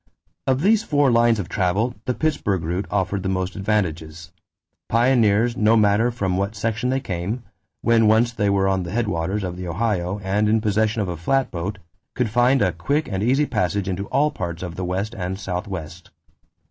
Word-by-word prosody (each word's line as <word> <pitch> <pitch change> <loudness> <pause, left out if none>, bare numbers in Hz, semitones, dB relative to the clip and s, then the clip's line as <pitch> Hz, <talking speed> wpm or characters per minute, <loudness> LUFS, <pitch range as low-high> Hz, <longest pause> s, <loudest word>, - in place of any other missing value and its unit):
Of 130 0 +2
these 215 +4 +4
four 145 - +2
lines 115 -1 +4
of 100 -4 -3
travel, 100 +6 0
the 125 - -1
Pittsburgh 105 - 0
route 90 +5 -2
offered 100 0 -1
the 95 - -2
most 95 0 -2
advantages. 85 -5 -2 0.6
Pioneers, 115 -1 +3
no 110 -1 +4
matter 105 +2 +3
from 95 -7 -1
what 100 +3 -2
section 115 +3 -1
they 130 +1 +1
came, 95 +3 -4 0.4
when 115 -2 +4
once 115 +2 +4
they 105 -3 0
were 100 -1 +2
on 95 -1 +1
the 85 - -5
headwaters 100 -2 -1
of 90 -1 -4
the 90 -1 -6
Ohio 95 0 -1
and 105 +3 +1
in 110 +1 +3
possession 110 0 +1
of - - -4
a 90 -1 -4
flatboat, 100 -2 -1 0.4
could 125 -4 -1
find 125 +1 +3
a 95 - +2
quick 140 - -1
and 95 0 -2
easy 130 +7 +2
passage 100 - -1
into 95 +1 -3
all 145 +3 +2
parts 85 - -5
of 90 -2 -5
the 90 - -5
West 95 +5 -2
and 95 -2 -4
Southwest. 90 -3 -5
100 Hz, 185 wpm, -22 LUFS, 90-115 Hz, 0.6 s, these